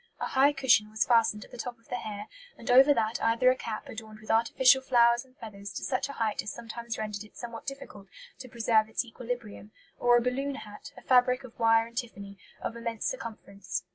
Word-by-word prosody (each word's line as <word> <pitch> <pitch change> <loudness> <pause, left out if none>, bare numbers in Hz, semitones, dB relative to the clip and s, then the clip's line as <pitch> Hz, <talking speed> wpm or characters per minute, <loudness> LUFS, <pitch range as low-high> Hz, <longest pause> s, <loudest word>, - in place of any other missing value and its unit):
A - - -2
high 275 +2 +4
cushion 260 -6 +3
was 215 0 0
fastened 225 -3 +2
at - - -21
the 245 - -11
top 245 0 -5
of 230 - -29
the 245 - -2
hair, 210 -3 -6 0.3
and 235 - -3
over 265 +3 +8
that 220 -4 0
either 230 +3 +4
a - - 0
cap 225 -4 -6
adorned 220 -1 -9
with 215 - -5
artificial 250 +4 +4
flowers 240 -2 +4
and 260 0 -25
feathers 200 -3 -9
to - - -6
such 260 +2 -1
a - - -6
height 220 -5 -1
as 205 - -5
sometimes 235 0 -6
rendered 210 -1 -4
it 215 - -17
somewhat 235 +2 -8
difficult 210 -7 -8 0.3
to 255 - -9
preserve 225 -2 +2
its 220 - -1
equilibrium, 235 -3 -7 0.3
or 240 0 +5
a - - +2
balloon 270 +3 -1
hat, 220 +3 -10
a - - -12
fabric 250 +1 +3
of 245 -2 -13
wire 225 0 +4
and 235 0 -4
tiffany, 200 -5 -9 0.2
of 230 - -3
immense 230 -1 -4
circumference. 200 -7 -5
230 Hz, 215 wpm, -29 LUFS, 215-250 Hz, 0.3 s, over